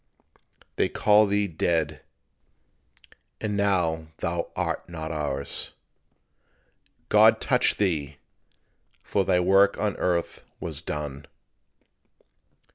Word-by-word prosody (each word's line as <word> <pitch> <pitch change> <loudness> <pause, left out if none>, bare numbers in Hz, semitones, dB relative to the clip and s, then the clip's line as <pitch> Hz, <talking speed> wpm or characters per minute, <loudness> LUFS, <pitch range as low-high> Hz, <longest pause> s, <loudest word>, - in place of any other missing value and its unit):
They - - +2
call 105 0 +4
thee 100 +1 +1
dead. 80 -3 -1 1.4
And 105 -2 -2
now 90 -6 +1
thou 85 0 -2
art - - -3
not 80 -2 -5
ours; 70 -3 -3 1.4
"God - - +6
touched - - +2
thee," 75 -8 -1 0.9
for 100 - 0
thy 90 -1 +2
work 95 +2 +4
on 105 -3 -1
earth 85 -2 -1 0.2
was 80 -3 -6
done. 75 -3 -5
85 Hz, 95 wpm, -26 LUFS, 75-100 Hz, 1.4 s, God